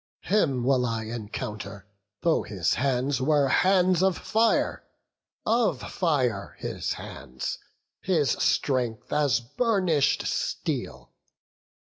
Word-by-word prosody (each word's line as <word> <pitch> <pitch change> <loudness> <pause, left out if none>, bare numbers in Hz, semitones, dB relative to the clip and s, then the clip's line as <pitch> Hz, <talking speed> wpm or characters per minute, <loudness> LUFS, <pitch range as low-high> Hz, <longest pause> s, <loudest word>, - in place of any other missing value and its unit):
Him 140 - +1
will 130 0 +3
I 115 -1 -2
Encounter, 105 -3 -6 0.4
though 165 -2 +2
his 95 -6 -1
hands 130 0 0
were 145 0 +3
hands 185 +1 +3
of 190 -2 +2
fire, 225 +1 +1 0.6
Of 215 - +2
fire 130 - 0
his - - -3
hands, 65 +1 -6 0.4
his 160 -8 +2
strength 125 -5 0
as 145 -7 +3
burnish'd 170 - +1
steel." 65 -1 -3
135 Hz, 100 wpm, -26 LUFS, 115-180 Hz, 0.6 s, will